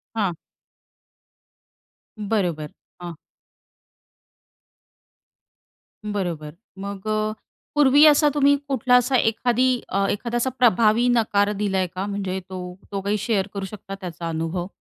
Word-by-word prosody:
हां. 200 -5 0 1.8
बरोबर, 180 -8 -2 0.3
हां. 175 -1 -6 2.9
बरोबर. 175 -7 -4 0.2
मग 200 +1 -6
अ, 215 0 0 0.4
पूर्वी 290 0 +6
असा 300 0 +6
तुम्ही 285 -1 +4
कुठला 260 -2 +2
असा 250 +2 +3
एखादी 245 +2 +2 0.2
अ, 195 +1 +1
एखादा 235 +3 -2
असा 250 +2 0
प्रभावी 230 0 +4
नकार 205 -2 +2
दिलाय 195 -2 0
का? 185 +2 -5
म्हणजे 195 -2 -3
तो 180 -1 -7 0.2
तो 200 -1 -3
काही 200 +2 0
शेअर 205 -2 0
करू 200 -1 -4
शकता 195 0 -8
त्याचा 170 -2 -6
अनुभव? 165 +2 -3
205 Hz, 115 wpm, -23 LUFS, 185-235 Hz, 2.9 s, पूर्वी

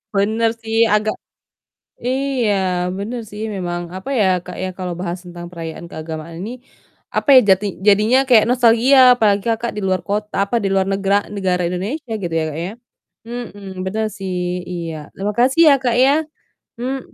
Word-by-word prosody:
Benar 220 +3 +2
sih, 225 0 -4 0.2
agak 215 0 +1 0.9
iya, 260 -3 0 0.5
benar 225 +5 -4
sih 210 +1 -7
memang 175 -2 -3
apa 190 +7 -7
ya, 205 - +4 0.2
Kak, 180 - -8
ya, 185 - -1
kalau 180 -2 -4
bahas 180 0 -3
tentang 175 -1 -9
perayaan 165 0 -7
keagamaan 160 +1 -7
ini, 220 - -5 0.6
apa - - 0
ya, - - +11
jati 190 +2 +4 0.2
jadinya 210 +5 +5
kayak 230 -5 +6
nostalgia, 245 +2 +4 0.2
apalagi 205 -4 +2
Kakak 230 +1 -2
di - - -2
luar 185 -1 0
kot 205 +1 0 0.2
apa 200 +4 -3
di - - +1
luar 190 -1 +2
negra 195 0 +1 0.2
negara 185 -2 0
Indonesia 220 - -4
gitu 170 -2 -3
ya, - - 0
Kak 150 - -5
ya. 185 - -5 0.6
Mhm, 235 -4 -7 0.2
benar 220 +3 -1
sih, 190 -2 -4 0.4
iya, 170 -2 -4 0.2
terima 205 +2 -2
kasih 265 +6 +4
ya, - - +7
Kak, 240 -2 +1
ya. 275 - +5 0.7
Mhm, 260 +2 -2
205 Hz, 170 wpm, -19 LUFS, 180-235 Hz, 0.9 s, ya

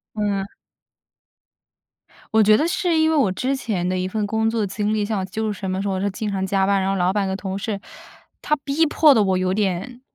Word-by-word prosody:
嗯。 200 -2 -2 1.8
我 220 - +5
觉 215 +1 +6
得 310 - +1
是 345 -1 0
因 315 0 +3
为 - - +1
我 265 -11 +3
之 260 +8 -1
前 210 -9 -2
的 185 0 -1
一 185 0 -1
份 210 +2 -2
工 220 +1 0
作 225 -2 0
经 205 +2 -2
历， 210 -1 0
像 210 -1 -2
我 190 - -2
就 215 +3 -3
是 205 - -7
什 190 - -4
么 185 +1 -2
时 200 - -3
候 195 - -1
我 185 - -2
是 200 - 0
经 210 +2 -4
常 190 -1 -2
加 195 0 +1
班， 195 0 +2
然 190 - 0
后 195 - 0
老 185 0 +1
板 200 -1 0
和 190 - -2
同 195 -1 -4
事， 200 0 -3 0.6
他 300 - +1
逼 290 +4 +2
迫 300 0 +5
得 220 -5 +3
我 190 -2 +1
有 185 0 0
点， 205 +5 -2
205 Hz, 265 characters per minute, -22 LUFS, 190-225 Hz, 1.8 s, 觉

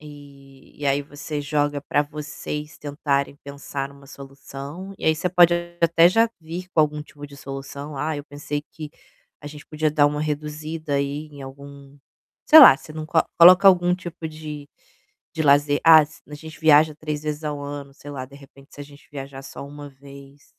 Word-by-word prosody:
e 140 -2 -15
e 145 - -2
aí 140 +1 +1
você 145 +1 -6
joga 145 0 -1
pra 145 - 0
vocês 150 0 -7
tentarem 140 -1 -2
pensar 140 -1 -6
numa 140 0 -17
solução. 140 +6 -10
E - - -8
aí 160 - +3
você 170 +3 -2
pode 175 -1 +5 0.3
até 170 +1 +5
já 225 +4 +3
vir 170 +3 -7
com 160 - +4
algum 150 0 0
tipo 145 -1 -12
de 140 0 -14
solução: 140 +2 -8
"Ah, 155 +2 -2
eu 145 - -7
pensei 145 0 -5
que 155 -2 -8 0.5
a 145 - -11
gente 150 0 -11
podia 155 0 -1
dar 145 -1 +3
uma 150 0 -2
reduzida 150 0 -4
aí 140 +2 -2
em 140 -1 -11
algum" 140 +1 -12 0.5
sei 315 - +10
lá, 255 - +10
você 145 +3 -13
não 155 0 -6
co 160 - +1 0.2
coloca 180 +3 +8
algum 180 -1 +3
tipo 175 -2 -8
de 150 -2 -9 0.7
de 160 -2 -2
lazer: 145 0 +3
"Ah, 160 -1 +8
se 155 - -18
a - - -10
gente 160 +2 -11
viaja 155 -1 +5
3 150 -1 -5
vezes 150 0 -4
ao 145 -1 -4
ano 140 -1 -7
sei 145 - -13
lá, 130 -2 -6
de 140 - -16
repente, 140 0 -17
se 145 - -9
a - - -6
gente 145 0 -18
viajar 135 -1 -8
só 135 0 -9
1 145 0 -10
vez". 140 +1 -15
145 Hz, 195 wpm, -22 LUFS, 140-155 Hz, 0.7 s, sei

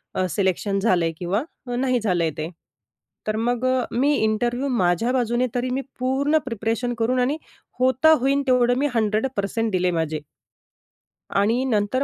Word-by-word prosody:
अ, 185 - +1
selection 195 +1 0
झालंय 180 -5 +2
किंवा 190 +7 -1 0.3
नाही 255 -1 +1
झालंय 175 -7 0
ते. 155 +2 -3 0.8
तर 215 - 0
मग 240 +2 0
अ, 255 -1 +2
मी 275 +5 +2
इंटरव्ह्यू 240 +4 0
माझ्या 180 +5 +2
बाजूने 245 0 +1
तरी 250 +1 0
मी 270 +2 -1 0.2
पूर्ण 275 +4 +2
प्रिपरेशन 230 +1 -2
करून 250 +3 +1
आणि 265 +5 +1 0.4
होता 260 +5 +4
होईन 275 +3 +2
तेवढं 245 -1 +4
मी 285 +2 +2
100% 220 0 0
दिले 180 -1 +1
माझे. 160 -3 -2 1.1
आणि 225 +6 +2
नंतर 230 +2 +1
235 Hz, 145 wpm, -23 LUFS, 200-255 Hz, 1.1 s, होता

